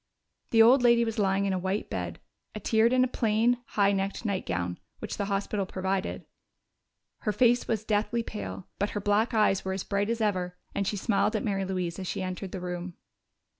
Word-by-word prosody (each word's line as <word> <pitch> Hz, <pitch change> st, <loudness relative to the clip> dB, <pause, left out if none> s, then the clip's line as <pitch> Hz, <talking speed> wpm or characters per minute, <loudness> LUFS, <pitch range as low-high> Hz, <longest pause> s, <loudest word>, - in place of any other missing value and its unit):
The 225 Hz, -1 st, +6 dB
old 250 Hz, +4 st, +6 dB
lady 235 Hz, -1 st, +5 dB
was 225 Hz, 0 st, -3 dB
lying 195 Hz, 0 st, +2 dB
in 195 Hz, -, +1 dB
a 185 Hz, -, 0 dB
white 190 Hz, +3 st, -2 dB
bed, 90 Hz, -2 st, -4 dB, 0.4 s
attired 220 Hz, +2 st, +3 dB
in 255 Hz, 0 st, +4 dB
a -, -, +2 dB
plain, 230 Hz, +1 st, +2 dB, 0.2 s
high 200 Hz, -1 st, +5 dB
necked 195 Hz, +3 st, -2 dB
nightgown 90 Hz, -, -2 dB, 0.2 s
which -, -, -6 dB
the 200 Hz, -, -1 dB
hospital 200 Hz, 0 st, -1 dB
provided. 190 Hz, +1 st, -2 dB, 0.9 s
Her 210 Hz, -, -1 dB
face 240 Hz, +3 st, +3 dB
was 220 Hz, -2 st, -1 dB
deathly 220 Hz, +2 st, 0 dB
pale, 95 Hz, -, -6 dB
but 205 Hz, -, +1 dB
her -, -, 0 dB
black 210 Hz, +4 st, +1 dB
eyes 210 Hz, -3 st, +3 dB
were 190 Hz, -, -2 dB
as 190 Hz, -, -3 dB
bright 200 Hz, +1 st, -1 dB
as 230 Hz, 0 st, 0 dB
ever, 185 Hz, -4 st, -1 dB, 0.2 s
and 200 Hz, -, -1 dB
she 205 Hz, -, -1 dB
smiled 210 Hz, +1 st, +1 dB
at 215 Hz, -, 0 dB
Mary 195 Hz, -2 st, -1 dB
Louise 180 Hz, -2 st, -3 dB
as 185 Hz, -, -5 dB
she -, -, -2 dB
entered 185 Hz, 0 st, -5 dB
the 190 Hz, -, -4 dB
room. 180 Hz, 0 st, -5 dB
200 Hz, 200 wpm, -28 LUFS, 185-220 Hz, 0.9 s, The